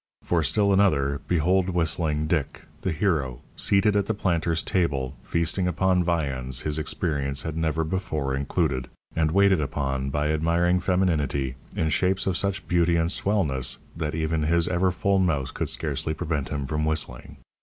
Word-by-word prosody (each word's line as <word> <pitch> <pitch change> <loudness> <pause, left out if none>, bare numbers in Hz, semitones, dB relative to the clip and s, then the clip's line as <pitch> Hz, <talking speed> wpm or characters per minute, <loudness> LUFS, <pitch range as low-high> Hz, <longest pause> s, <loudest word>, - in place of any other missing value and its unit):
For 85 -2 +1
still 100 +7 +2
another, 70 -8 +2
behold 90 +3 +2
Whistling 80 -3 0
Dick, 75 -3 -2 0.2
the 95 - -1
hero, 75 -8 -1
seated 100 +1 +2
at 100 -1 +1
the 110 - 0
planter's 85 -4 0
table, 70 -8 0
feasting 85 +2 -1
upon 90 +1 +2
viands 70 -7 -1
his 75 0 -1
experience 70 -4 -1
had 80 -1 -4
never 80 0 0
before 80 -5 -2
included, 70 -2 -1 0.3
and 80 -1 +2
waited 95 0 +4
upon 70 -1 -2
by 75 +2 0
admiring 85 +3 +2
femininity 75 -8 0 0.2
in 80 - 0
shapes 95 +4 +1
of 95 - 0
such 100 +1 -1
beauty 85 -1 +3
and 85 +1 +1
"swellness" 85 -13 +1 0.2
that 80 -2 -3
even 80 0 0
his 85 +2 +2
ever 90 +1 +2
full 95 +2 +1
mouth 80 -8 0
could - - -2
scarcely 80 - -2
prevent 75 -3 -2
him 70 -2 -3
from 75 +2 -2
whistling. 75 -6 -2
80 Hz, 160 wpm, -25 LUFS, 75-90 Hz, 0.3 s, waited